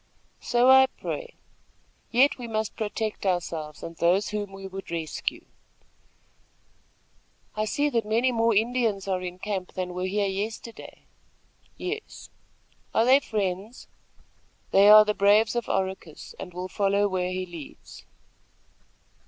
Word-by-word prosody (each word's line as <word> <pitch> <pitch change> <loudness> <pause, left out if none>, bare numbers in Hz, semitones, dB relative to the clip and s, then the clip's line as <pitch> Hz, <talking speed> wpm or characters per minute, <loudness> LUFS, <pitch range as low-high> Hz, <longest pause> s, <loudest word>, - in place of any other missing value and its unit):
"So 240 +1 +2
I 265 0 +8
pray; - - -6 0.7
yet 260 +3 +3
we 240 - -6
must 220 -1 -2
protect 215 0 -3
ourselves 165 -5 -2
and 165 - -7
those 180 +5 +2
whom 205 -1 -4
we 195 0 -9
would 195 0 -8
rescue." 165 -2 -4 2.1
"I 215 0 0
see 285 +7 0
that 230 -3 +1
many 230 +5 +1
more 230 -1 +2
Indians 220 -3 +1
are 185 -1 -1
in 180 0 -6
camp 190 -1 -4
than 180 -1 -4
were 180 +1 -2
here 205 +2 0
yesterday." 215 +4 -6 0.7
"Yes." 435 +4 -6 0.6
"Are 225 - +4
they 265 +3 +6
friends?" 205 -1 -4 0.8
"They 200 +1 +6
are 215 0 +10
the 210 - +1
braves 210 +3 +4
of 240 -2 -2
Oracus, 190 -5 -3
and 180 - -7
will 180 +1 -5
follow 200 +1 +1
where 185 -2 -1
he 185 0 -3
leads." 170 -5 -11
205 Hz, 135 wpm, -26 LUFS, 185-225 Hz, 2.1 s, are